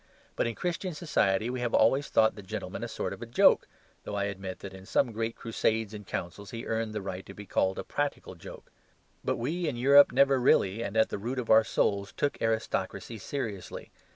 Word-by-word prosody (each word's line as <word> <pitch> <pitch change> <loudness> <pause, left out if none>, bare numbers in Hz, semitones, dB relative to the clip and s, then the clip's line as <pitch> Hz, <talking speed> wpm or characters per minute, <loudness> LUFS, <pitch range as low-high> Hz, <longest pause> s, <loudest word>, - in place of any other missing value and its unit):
But - - +1
in 115 - -3
Christian 180 0 -3
society 110 - +1
we 130 - -3
have 120 -1 0
always 135 +6 +3
thought 110 0 +4
the 105 - -10
gentleman 95 - -5
a - - -2
sort - - -4
of - - -8
joke, - - +5 0.4
though 105 - -5
I 100 - 0
admit 95 -2 -4
that 100 -1 -8
in 95 0 -12
some 125 - +2
great 115 +1 -3
crusades 110 -1 -1
and 105 -2 -9
councils 95 +3 -5
he 115 0 -6
earned 110 -1 -2
the 105 - -3
right 95 -1 -5
to 100 - -10
be 105 - -9
called 95 0 0
a - - -3
practical 145 -1 -3
joke. - - -12 0.5
But - - 0
we 160 +8 -2
in 145 - -1
Europe 140 +3 +7
never 135 0 +4
really 110 -4 +3
and 110 -2 -3
at 110 - +4
the - - -4
root 120 +6 -4
of 125 -3 -1
our 110 0 +7
souls 100 -2 0
took 145 - -2
aristocracy 110 0 -2
seriously. 105 -6 -5
110 Hz, 210 wpm, -29 LUFS, 100-130 Hz, 0.5 s, Europe